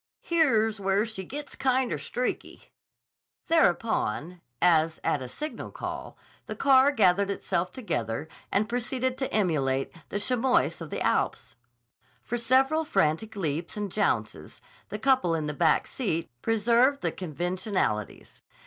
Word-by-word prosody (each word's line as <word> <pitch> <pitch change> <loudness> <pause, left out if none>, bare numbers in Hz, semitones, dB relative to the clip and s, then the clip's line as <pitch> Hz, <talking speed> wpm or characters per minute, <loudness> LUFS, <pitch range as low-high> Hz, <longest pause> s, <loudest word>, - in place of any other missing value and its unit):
Here's 225 -11 +2
where 195 +2 +1
she 220 -4 -6
gits 285 +9 -7
kinder 260 -1 +1
streaky." 250 +1 -4 0.7
Thereupon, 180 - +1 0.2
as 165 -2 +3
at 145 - 0
a 130 - -5
signal 305 - -6
call, - - -6 0.3
the - - -5
car 270 0 +5
gathered 200 -5 +3
itself 180 -2 -1
together 130 - -3 0.2
and 210 +2 +2
proceeded 250 +2 -2
to 265 - -2
emulate 145 -10 0
the 205 - -2
chamois 250 -3 +2
of 165 - -6
the - - -4
Alps. - - 0 0.7
For 240 - -3
several 265 +6 +3
frantic 195 - 0
leaps 165 0 -3
and 205 -2 -3
jounces 115 - -1 0.3
the 210 - -4
couple 255 -8 +2
in 155 -2 -2
the 150 - -3
back 160 0 +3
seat 170 - -2
preserved 235 +5 +3
the - - 0
conventionalities. 175 - -3
205 Hz, 130 wpm, -27 LUFS, 165-255 Hz, 0.7 s, car